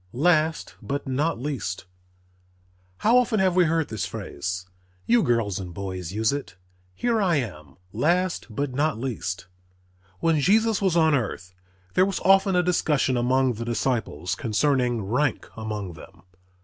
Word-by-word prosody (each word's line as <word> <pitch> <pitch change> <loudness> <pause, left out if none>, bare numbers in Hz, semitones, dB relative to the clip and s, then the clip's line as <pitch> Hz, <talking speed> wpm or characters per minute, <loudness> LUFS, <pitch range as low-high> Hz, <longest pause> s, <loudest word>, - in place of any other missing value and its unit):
"_ - - -37
LAST 160 +3 +2
BUT 140 0 -3
NOT 145 +4 0
LEAST 125 -10 -4 1.1
How 235 +4 +4
often 235 -3 +1
have 185 -2 +2
we 180 -1 +5
heard 160 -1 0
this 110 -4 -3
phrase! 90 +5 -5 0.4
You 240 -1 +4
girls 115 - 0
and 90 -3 -7
boys 95 -3 -5
use 110 +4 +1
it, 140 -8 -5 0.4
"Here 230 - +1
I 180 -4 +2
am, 85 - -4 0.2
last 175 - +1
but 130 +4 -3
not 150 0 +1
least." 95 -8 -4 0.7
When 165 -2 +2
Jesus 215 +6 +3
was 185 -4 +2
on 160 -2 +4
earth 95 -8 -2 0.4
there 185 - +4
was 195 - -2
often 195 0 +4
a 180 - +3
discussion 150 -6 +1
among 130 +1 +2
the 115 +1 -5
disciples 115 - -1
concerning 120 - +1
rank 125 +6 0
among 105 -4 -5
them. 85 +2 -14
130 Hz, 150 wpm, -25 LUFS, 105-165 Hz, 1.1 s, we